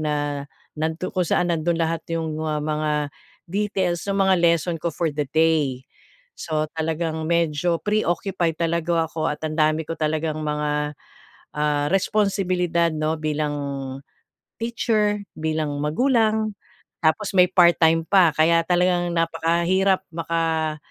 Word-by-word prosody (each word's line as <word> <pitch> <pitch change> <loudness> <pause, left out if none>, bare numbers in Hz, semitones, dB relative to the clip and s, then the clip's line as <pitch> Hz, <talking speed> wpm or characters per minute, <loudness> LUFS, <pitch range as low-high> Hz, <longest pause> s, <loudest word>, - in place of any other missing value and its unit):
na, 145 -2 -2 0.3
nagtu 160 +3 -2
kung 185 - +1
saan 180 - +2
nando'n 165 +1 0
lahat 165 0 0
yung 160 -2 -2
mga 155 -1 -1
mga 155 0 -1 0.6
details 195 -3 -1
nung 200 0 +2
mga 190 -1 +4
lesson 170 0 +2
ko 170 - -1
for 165 -2 0
the 145 0 -2
day. 155 -5 +2 0.6
So 155 -1 -1
talagang 160 0 -2
medyo 170 0 +1
pre-occupied 185 -4 0
talaga 170 0 0
ako 160 -1 -2
at 150 - -6
ang 155 0 -3
dami 155 +1 +3
ko - - -3
talagang 155 0 -1
mga, 150 0 -1 0.6
ah, 150 -1 +1
responsibilidad 185 -4 +1
'no 155 +1 -1
bilang, 150 -1 -1 1.0
teacher, 220 -3 0 0.2
bilang 155 -2 -2
magulang 220 - +1 0.5
tapos 160 +7 +1
may 180 - +8
part-time 165 -2 +4
pa 185 -5 +5
kaya 165 +2 +4
talagang 180 -1 +2
napakahirap 170 +3 +1
maka 165 -2 -1
165 Hz, 125 wpm, -23 LUFS, 155-180 Hz, 1.0 s, may